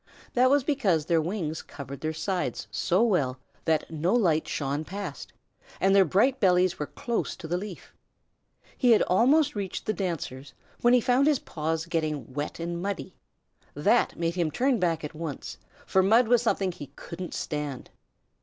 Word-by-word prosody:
That 255 +1 +4
was 280 0 +4
because 215 - +1
their 165 -1 +2
wings 165 -2 -3
covered 140 -1 -9
their 155 - -1
sides 180 +3 -3
so 185 +5 +2
well 145 - +1 0.3
that 160 -2 +1
no 165 +7 +1
light 170 -9 +2
shone 140 +1 -2
past, 185 -5 -7 0.5
and 195 +1 +3
their 195 -1 +6
bright 235 - +2
bellies 180 -3 +3
were 150 - -2
close 235 -2 -3
to 165 - -9
the 170 - -1
leaf. 190 0 -7 0.8
He 245 -3 +5
had 215 - +4
almost 275 - +3
reached 200 -3 -4
the 215 - 0
dancers 160 -8 -4 0.3
when 240 +1 +5
he 245 - +4
found 255 +4 +3
his 300 -2 +4
paws 160 -5 -3
getting 155 -5 -2
wet 145 +4 -4
and 170 +1 -3
muddy. 200 +1 -4 0.6
That - - +2
made 165 0 0
him 170 -3 0
turn 250 - +1
back 165 -3 0
at 150 - -5
once, 155 -3 -6 0.3
for 190 - +3
mud 225 +5 +4
was 240 0 +4
something 195 -5 +1
he 145 -4 -9
couldn't 175 +1 -7
stand. 150 -4 -4
180 Hz, 175 wpm, -27 LUFS, 155-220 Hz, 0.8 s, their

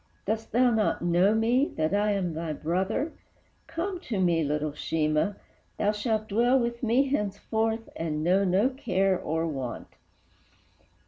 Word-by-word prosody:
Dost 220 +2 -2
thou 245 +1 +4
not 220 -6 +1
know 175 +5 +3
me, 240 +6 +3
that 155 +2 0
I 205 +1 +2
am 185 -4 -1
thy 160 0 -3
brother? 190 - -1 0.5
Come 345 +4 -3
to 225 - -4
me, 170 -3 +2
little 150 +1 -1
Sheemah, 155 +5 0 0.4
thou 205 - +2
shalt 215 0 -1
dwell 240 +5 +3
With 235 -1 -2
me 255 +4 +2
henceforth, 220 -1 -1
and 155 -2 -2
know 185 +4 +3
no 195 +6 +3
care 195 -7 0
or 160 -1 -1
want!" 135 -7 -5
205 Hz, 145 wpm, -27 LUFS, 165-230 Hz, 0.5 s, thou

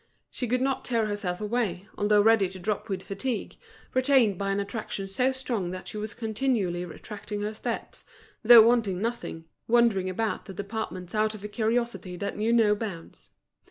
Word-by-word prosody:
She 250 - -3
could 250 +2 +1
not 270 0 0
tear 230 -3 +1
herself 205 -4 -2
away, 210 -4 -2
although 205 0 +3
ready 220 -4 +4
to 190 - -9
drop 210 +3 -3
with 190 -1 -3
fatigue, 235 +3 -3 0.4
retained 255 -5 +4
by 195 +2 -2
an 195 0 0
attraction 200 -1 -4
so 250 +7 +1
strong 240 -8 -3
that 185 +1 -7
she - - -7
was 210 0 -4
continually 220 -6 -1
retracing 205 +4 -7
her 210 +1 -2
steps, 230 +2 -5 0.4
though 230 -1 +9
wanting 220 -6 +2
nothing, 225 -7 -4 0.2
wandering 230 -6 +3
about 220 +4 -2
the 195 - -9
departments 195 -3 -5
out 215 0 +1
of 205 - -11
a - - -3
curiosity 225 -4 -1
that 200 +2 -3
knew 220 +2 0
no 225 -3 +5
bounds. 205 -6 -7
210 Hz, 175 wpm, -27 LUFS, 195-235 Hz, 0.4 s, though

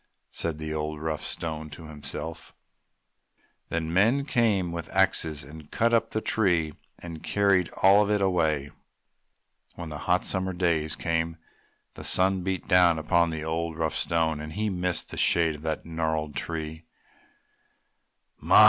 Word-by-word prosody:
said 85 -2 -3
the 80 0 -4
old, 75 0 -3
rough 80 -1 -3
Stone 80 -2 -4
to 75 +3 -10
himself. 80 +2 -6 1.1
Then 80 0 -2
men 115 +9 +3
came 105 - +1
with 85 -2 -5
axes 80 -6 +1
and 75 +2 -12
cut 115 +1 +1
up 115 -1 +3
the 110 - -2
tree 90 -10 +1 0.2
and 85 -2 -8
carried 100 -3 +2
all 100 +2 +7
of 105 - +1
it 105 0 +2
away. 80 -7 +1 1.0
When 85 -2 -7
the 75 -1 -6
hot 90 +1 +3
summer 95 0 -2
days 85 -4 +1
came 80 -1 -1 0.6
the - - -10
sun 95 0 +4
beat 95 0 -3
down 90 -3 +5
upon 85 +2 +2
the 80 -1 -4
old, 80 +1 -2
rough 80 -1 0
Stone 80 -2 0
and 75 0 -7
he 105 +3 -1
missed 90 -1 -2
the - - -7
shade 80 -2 +3
of - - -14
the 80 0 -2
gnarled 80 -2 -2
tree. 80 -1 -4 1.5
"My! - - +5
85 Hz, 155 wpm, -27 LUFS, 80-95 Hz, 1.5 s, all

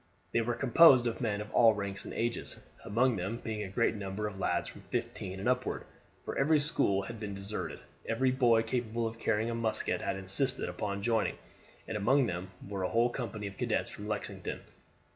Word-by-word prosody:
They 115 - +2
were 120 +1 -1
composed 130 +1 +7
of 120 0 -2
men 105 -4 0
of 105 - -8
all 115 -2 +6
ranks 100 -1 -3
and - - -6
ages, 120 0 -2 0.3
among 120 +2 +2
them 95 +6 -2
being 110 -2 -4
a 100 - -4
great 115 +5 +2
number 100 0 -4
of 100 -2 -5
lads - - 0
from - - -10
fifteen 95 0 -4
and 100 - -2
upward; 125 0 0 0.4
for - - -4
every 150 +3 +4
school 100 -9 +1
had 115 +3 -7
been 105 -2 -4
deserted. 100 +2 -4 0.3
Every 130 +3 +2
boy 120 -3 +4
capable 115 0 -1
of 115 0 -4
carrying 110 +2 +1
a - - -2
musket 115 -1 -1
had - - -1
insisted 95 +8 0
upon 100 -1 -3
joining, 115 -1 +1 0.5
and 110 - -4
among 130 +6 +4
them 90 -3 -3 0.2
were 100 -1 -4
a 90 - 0
whole 120 +1 +3
company 115 -4 -4
of 100 -1 -6
cadets - - 0
from 105 - -8
Lexington. 105 -1 -4
110 Hz, 200 wpm, -31 LUFS, 100-120 Hz, 0.5 s, composed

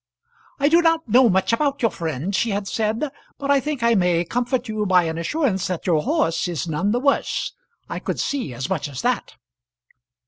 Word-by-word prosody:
"I 285 - +3
do 335 +3 +5
not 330 -2 +2
know 240 +2 +5
much 190 +3 +2
about 280 +2 0
your 230 - +3
friend," 160 +3 -3
she 230 - +1
had 200 -1 -2
said; 225 +8 -1 0.3
"but 280 0 -1
I 280 - +5
think 280 -2 -3
I 235 0 +4
may 180 -4 +2
comfort 245 +6 -1
you 215 -1 -2
by 180 -1 +5
an 160 0 -3
assurance 195 - 0
that 180 -3 -4
your 165 -4 +2
horse 165 +3 0
is 170 -3 -3
none 160 +5 0
the 235 +3 +1
worse. 280 +2 0 0.4
I - - -4
could - - -4
see 275 - -2
as 125 +2 -4
much - - -2
as 135 -2 -6
that." 250 0 -1
215 Hz, 205 wpm, -22 LUFS, 175-265 Hz, 0.4 s, do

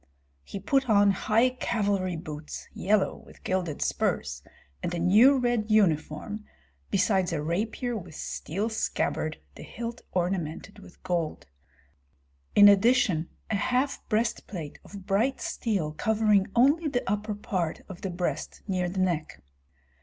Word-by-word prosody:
He 200 - -7
put 265 +6 +1
on 205 -1 +5
high 225 +6 +2
cavalry 200 -7 -1
boots, 155 -2 -7
yellow, 205 +1 +1
with - - -17
gilded 180 -5 -1
spurs, 70 -2 -1 0.4
and - - -2
a - - -2
new 215 +11 +6
red 240 -4 0
uniform, 200 0 +1 0.5
besides 190 -2 +2
a 165 - -1
rapier 215 +10 -2
with 175 -7 -7
steel 195 +8 -3
scabbard, 155 -7 -1 0.2
the - - -12
hilt 235 +1 -6
ornamented 180 +1 -2
with 180 - -16
gold; 175 -4 -2 1.1
in 205 0 +9
addition 200 -5 +4 0.2
a - - +2
half 250 +7 0
breastplate 215 - -2
of 195 -2 -11
bright 225 +8 +1
steel 195 -10 -2
covering 210 +3 +2
only 285 +7 +4
the 245 -4 -1
upper 210 +1 -1
part 185 -5 -2
of 190 -3 -10
the 195 - -3
breast 175 -4 -3
near 180 -2 0
the 185 +1 -2
neck. 170 -4 -1
200 Hz, 135 wpm, -27 LUFS, 175-220 Hz, 1.1 s, in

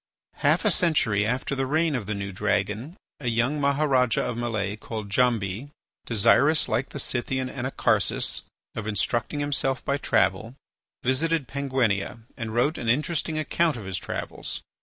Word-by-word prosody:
Half - - +2
a - - +5
century 110 - +2
after 125 +4 -1
the 135 -1 -1
reign 155 +2 +2
of 120 -7 -3
the 105 - -1
new 100 0 -4
dragon 105 - -1 0.2
a 130 - -5
young 120 +6 +1
Maharajah 140 -3 +2
of 120 - -2
Malay, 110 -4 -2
called 110 -1 -6
Djambi, 115 +1 +1 0.4
desirous, 140 +7 +4
like 120 +3 0
the - - -7
Scythian 130 0 -1
Anacharsis, 130 0 0 0.3
of 110 -2 -5
instructing 120 +7 -1
himself 135 -2 -1
by 140 - +1
travel, 100 +2 +1 0.5
visited 140 +3 +1
Penguinia 130 -7 0 0.2
and 110 -2 -5
wrote 125 +8 +1
an 115 - -2
interesting 155 +4 0
account 155 -1 +1
of 105 - -7
his 95 -1 -3
travels. - - -4
125 Hz, 150 wpm, -26 LUFS, 110-140 Hz, 0.5 s, a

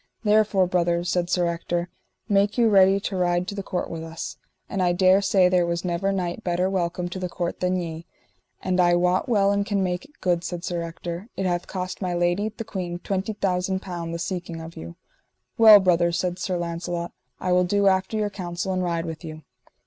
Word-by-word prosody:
Therefore 210 -3 +3
brother, 175 -1 +1
said 175 0 -1
Sir 180 -1 +2
Ector, 170 +1 -2 0.4
make 200 0 +2
you 235 -2 +4
ready 195 -1 +5
to 195 - -3
ride 175 0 +1
to - - -4
the 200 - -4
court 185 -1 -3
with 165 -1 -6
us, 165 0 -6 0.3
and 195 - -2
I 175 -1 +3
dare 185 +2 +4
say 195 -2 +4
there 180 -1 +3
was 170 +1 -2
never 180 +3 0
knight 185 +2 -3
better 180 +1 0
welcome 175 -1 -1
to 185 - -6
the 180 -1 -3
court 175 0 -3
than 180 0 +1
ye; 165 -2 -5 0.6
and 185 0 0
I 175 -1 +5
wot 180 +7 +1
well 200 -4 +3
and 200 0 +1
can 200 -2 0
make 180 -1 -2
it 295 - -23
good, 175 -2 0
said 175 0 -5
Sir 175 -2 -2
Ector, 170 +3 -6
it 190 - -1
hath 175 -1 -1
cost 185 0 -5
my 180 -2 -1
lady, 175 +5 +1
the 220 +1 -7
queen, 180 -5 -4
twenty 195 +3 -3
thousand 190 -1 -1
pound 170 -3 -5
the 170 - -3
seeking 175 -1 -4
of 165 0 -9
you. 85 +1 -9 0.6
Well 220 -2 +10
brother, 175 -2 +3
said 180 +1 -2
Sir 185 -1 -1
Launcelot, 170 0 -4 0.3
I 180 - -1
will 180 0 +4
do 200 +3 +1
after 190 +2 +2
your 210 -1 -1
counsel, 180 0 -4
and 185 - -1
ride 170 -1 -1
with 160 0 -6
you. 155 -1 -8
180 Hz, 215 wpm, -24 LUFS, 175-195 Hz, 0.6 s, Well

